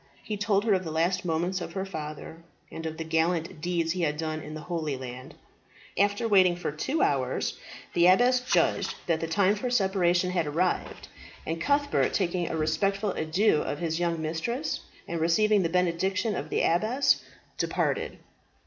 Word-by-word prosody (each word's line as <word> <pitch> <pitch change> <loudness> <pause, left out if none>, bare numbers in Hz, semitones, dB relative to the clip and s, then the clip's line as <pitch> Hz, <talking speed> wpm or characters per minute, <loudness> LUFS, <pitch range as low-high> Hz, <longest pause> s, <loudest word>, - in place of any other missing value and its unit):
He 215 - -3
told 205 -1 +1
her 215 - +4
of 185 -1 +1
the 165 - -5
last 175 +3 0
moments 175 +3 -1
of 165 - -6
her 190 +1 -2
father, 160 -2 -7 0.3
and 160 0 -5
of 160 0 -6
the 165 - -3
gallant 160 +1 0
deeds 170 -1 0
he 180 +1 -2
had 150 -2 0
done 155 0 -3
in 155 0 -8
the 155 - -6
Holy 155 -4 -3
Land. 130 0 -8 0.6
After 205 +4 +1
waiting 185 -4 +5
for 175 - -3
two 265 - -1
hours, 135 -3 0 0.3
the 175 0 +5
abbess 245 +7 +5
judged 250 - +1
that 165 -2 +1
the 165 - -3
time 195 +4 +3
for 230 +4 -3
separation 185 -5 +2
had 170 -4 0
arrived; 175 +5 -1 0.4
and 165 +1 -3
Cuthbert, 285 0 +1
taking 175 -2 0
a 160 - -2
respectful 195 +6 0
adieu 170 +4 +2
of 145 - -3
his 160 0 -2
young 170 -1 0
mistress, 165 - -2 0.3
and 170 -1 -3
receiving 210 +5 +3
the 165 - 0
benediction 180 +4 0
of - - -4
the - - 0
abbess, 220 +11 +2 0.4
departed. - - -1
175 Hz, 175 wpm, -27 LUFS, 160-195 Hz, 0.6 s, waiting